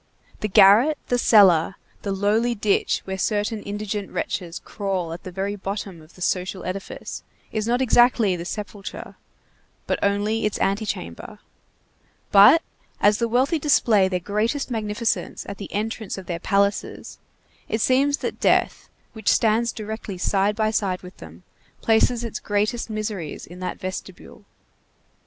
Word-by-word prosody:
The 215 - -1
garret, 210 +9 +6
the 245 - +2
cellar, 195 -6 +5 0.3
the 200 - -3
lowly 215 +5 +1
ditch 205 -1 +1
where 190 0 -4
certain 210 +2 -1
indigent 205 0 -4
wretches 170 -2 -4
crawl 190 -5 -3
at 170 - -8
the 185 - -8
very 195 +3 -3
bottom 195 -3 -5
of 155 +2 -19
the 180 - -6
social 185 +1 -2
edifice, 190 +2 -6 0.3
is 215 0 -2
not 245 +2 +2
exactly 240 -5 +4
the 170 - -5
sepulchre, 205 +1 -7 0.7
but - - -1
only 205 +2 0
its 210 - -4
antechamber; 195 - -3 0.9
but, 205 +12 +8 0.4
as 205 +1 +4
the 235 - +1
wealthy 260 +8 +1
display 230 -9 +3
their 185 -1 -1
greatest 220 - -1
magnificence 220 0 -2
at 200 - -7
the 200 - -7
entrance 220 0 -3
of 190 - -8
their 170 -1 -4
palaces, 200 +2 -1 0.5
it 220 - -1
seems 275 +5 +3
that - - -5
death, - - +1 0.2
which 220 -1 -1
stands 225 +1 +3
directly 215 -3 -6
side 195 +3 +1
by 215 0 +1
side 195 -4 -1
with 180 +1 -12
them, 80 +2 -13 0.4
places 230 +2 +2
its 230 - -4
greatest 215 +4 -1
miseries 215 -7 -4
in 175 +2 -12
that 185 - -4
vestibule. 185 +1 -8
205 Hz, 145 wpm, -23 LUFS, 190-225 Hz, 0.9 s, but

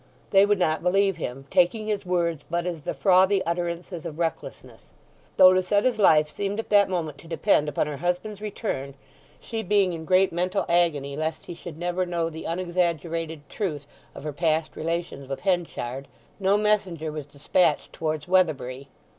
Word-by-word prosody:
They 195 0 +6
would 205 0 +3
not 160 -4 +1
believe 195 +1 +2
him, 135 -3 -5
taking 180 +5 +2
his 205 -3 -2
words 170 -4 0
but 170 +1 -1
as 170 -3 -3
the - - -3
frothy 190 0 +4
utterances 170 0 -3
of 155 - -6
recklessness. 165 -1 -5 0.5
Though 185 -1 +9
Lucetta's 205 +6 +2
life 155 -6 +5
seemed 200 +6 -3
at 225 - -5
that 205 -2 +5
moment 160 -6 -3
to 165 - -14
depend 165 -2 +2
upon - - 0
her 150 -1 -5
husband's 180 +6 -2
return 170 - -4 0.4
(she 225 -2 -4
being 195 -2 +2
in 160 -1 -6
great 185 +1 +3
mental 180 +3 0
agony 155 -5 +1
lest 155 +2 -3
he - - -7
should 165 -2 -9
never 175 +2 -1
know 170 -2 -2
the 160 0 -8
unexaggerated 165 -3 -2
truth 150 -6 -4 0.3
of - - -9
her 150 -1 -4
past 155 0 0
relations 165 -4 -3
with 135 - -4
Henchard), 160 -8 -2 0.3
no 195 +1 +3
messenger 190 -7 0
was 150 -2 -6
despatched 150 +2 +1
towards 155 -1 -3
Weatherbury. 140 -8 +1
170 Hz, 170 wpm, -25 LUFS, 155-190 Hz, 0.5 s, Though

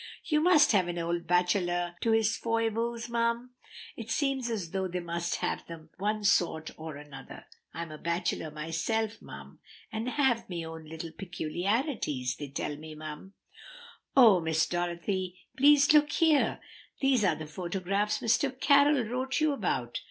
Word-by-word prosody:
"You 300 -1 +1
must 310 -6 +5
leave 185 -4 +3
an 175 0 -4
old 170 0 -2
bachelor 175 0 +1
to 230 - +1
his 225 0 +3
foibles, 230 +1 -1
mum. 235 +1 -1 0.4
It 225 -1 -8
seems 265 0 0
as 200 -8 -3
though 190 -1 -1
they 180 0 -3
must 170 0 -2
have - - -2
them 160 -2 -10
of - - -36
one 210 +2 -1
sort 165 -5 +2
or 160 -1 -7
another. 145 -1 -11 0.3
I'm 165 0 -6
a 155 - -9
bachelor 170 -1 -2
myself, 165 +9 -2
mum, - - -11 0.3
and 220 +3 -3
have 250 -5 +1
me 170 -2 -4
own 160 0 -8
little 160 +1 -7
peculiarities, 175 - -2
they 145 - -6
tell 145 +2 -4
me, 155 0 -9
mum." 155 +5 -8 0.8
"Oh, 225 -8 +8
Miss 160 0 +1
Dorothy, 175 +1 -3 0.2
please 290 +2 +6
look 295 -1 +5
here! 320 -3 +3 0.4
These 270 -5 +3
are 180 -5 +3
the 155 - -7
photographs 185 +5 -2
Mr. 255 +3 +1
Carroll 285 -1 +5
wrote 255 +4 -2
you 310 -1 +2
about!" 130 - -2
190 Hz, 160 wpm, -29 LUFS, 165-235 Hz, 0.8 s, Oh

